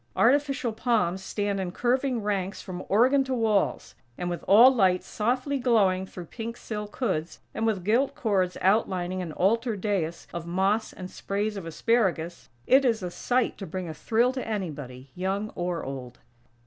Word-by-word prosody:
Artificial 275 -1 +2
palms 215 -6 0
stand 205 -1 -2
in 185 -2 -3
curving 250 +2 0
ranks 200 -1 -2
from 185 -2 -7
organ 255 +7 +4
to 260 -1 -1
walls; 220 -4 0 0.2
and, 175 0 -3
with 175 - -5
all 235 +7 +8
lights 185 -6 +2
softly 255 +5 -1
glowing 200 -7 +2
through 180 -2 -9
pink 230 +6 -6
silk 210 -1 -6
hoods; 185 -10 -2 0.2
and 225 +1 -1
with 200 -5 0
gilt 235 +8 +2
cords 190 -6 0
outlining 185 -2 +1
an 170 -3 -5
altar 225 +7 +1
dais 185 -5 -2
of 170 0 -5
moss 195 +5 +1
and 185 -1 -9
sprays 205 +2 -2
of 190 -4 -6
asparagus, 175 - 0 0.2
it 270 +2 +5
is 230 -5 +1
a 180 - -3
sight 245 +6 0
to 195 - -6
bring 180 +2 -5
a 160 - -5
thrill 235 +10 +1
to 260 - -4
anybody, 145 - -5
young 195 +4 -2
or 175 -1 -3
old. 130 -2 -7
200 Hz, 170 wpm, -27 LUFS, 180-230 Hz, 0.2 s, all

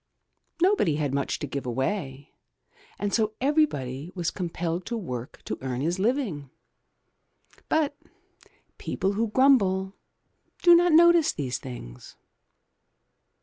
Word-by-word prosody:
Nobody 360 - +3
had 145 -3 -2
much 140 0 -1
to - - -5
give 140 -2 -5
away, 135 - -3 0.6
and 205 0 -3
so 220 -2 +1
everybody 170 - 0
was 175 -3 -1
compelled 170 -1 -3
to 235 - -2
work 125 - -7
to - - -4
earn 130 -1 -3
his 170 +5 -1
living. 200 - -1 1.2
But 300 -2 +1 0.8
people 195 - -1
who 225 +3 0
grumble 200 -6 +3 0.7
do 345 -1 +8
not 345 0 +5
notice 340 0 +6
these 130 -4 -4
things. 65 - -10
185 Hz, 115 wpm, -26 LUFS, -, 1.2 s, do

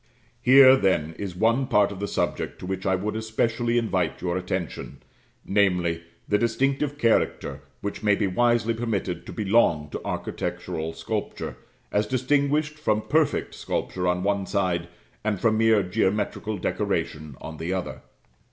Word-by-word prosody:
Here, 130 +1 +8
then, 85 -8 +1
is 95 -3 -4
one 115 +7 +2
part 105 -6 +3
of 100 - -7
the 100 - -2
subject - - -2
to - - -8
which 95 +1 -3
I 95 - +3
would 105 +3 -3
especially 115 +2 0
invite 95 -8 0
your 90 -1 -2
attention, 90 -2 -4 0.4
namely, 90 -4 +2 0.3
the 105 - +2
distinctive 135 +5 0
character 90 - +1 0.2
which 100 - -4
may 105 -2 +3
be 105 - 0
wisely 115 +3 +2
permitted 105 -7 -3
to - - -6
belong 95 -9 +2
to - - -5
architectural 80 +1 -4
sculpture, 100 +7 -4 0.4
as 105 +1 +1
distinguished 145 +4 +1
from 110 -7 +1
perfect 155 0 +1
sculpture 90 -1 -3
on 90 0 +1
one 100 -1 0
side, 90 -4 0 0.4
and 105 -3 -1
from 110 0 +2
mere 110 -2 +4
geometrical 105 +3 -1
decoration 75 -4 -2
on 80 0 -8
the 80 +3 -3
other. 95 -1 -3
105 Hz, 150 wpm, -25 LUFS, 90-115 Hz, 0.4 s, Here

